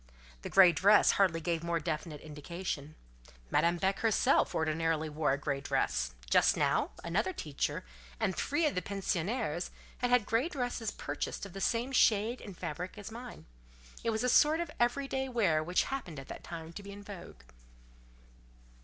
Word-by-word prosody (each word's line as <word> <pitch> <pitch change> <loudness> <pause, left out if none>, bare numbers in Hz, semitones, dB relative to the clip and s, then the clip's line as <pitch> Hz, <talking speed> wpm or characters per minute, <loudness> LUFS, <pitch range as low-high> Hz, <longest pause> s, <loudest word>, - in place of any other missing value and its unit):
The - - -6
grey 190 -2 +8
dress 200 +6 +5
hardly 180 -4 +2
gave 165 -1 -1
more 170 0 0
definite 155 -1 -4
indication. 155 0 -6 0.6
Madame 170 +1 +3
Beck 190 +2 0
herself 225 -2 +3
ordinarily 160 0 0
wore 150 -2 +1
a - - 0
grey 140 -1 -2
dress 65 - 0
just - - +4
now; - - +2
another 195 - 0
teacher, 150 - -3 0.3
and 185 - 0
three 320 +3 0
of 295 - +2
the 180 - -1
pensionnaires, 195 -1 -2 0.3
had 245 - 0
had 245 -4 +4
grey 235 +10 +1
dresses 245 - -2
purchased - - -4
of 195 - -10
the 195 - -6
same 240 +5 0
shade 225 -1 +3
and 195 -5 -9
fabric 180 +7 -5
as 205 +1 -8
mine: 240 +1 -9 0.6
it 230 - 0
was 220 +1 0
a - - +2
sort 305 +6 +5
of 340 - -3
every 245 +3 +1
day 265 0 -2
wear 185 -11 +2
which 180 +3 +2
happened 180 - -5
at 135 - -11
that - - -8
time 165 -1 -8
to 205 - -7
be 200 0 -9
in 205 0 -10
vogue. 175 - -10
190 Hz, 175 wpm, -32 LUFS, 160-230 Hz, 0.6 s, grey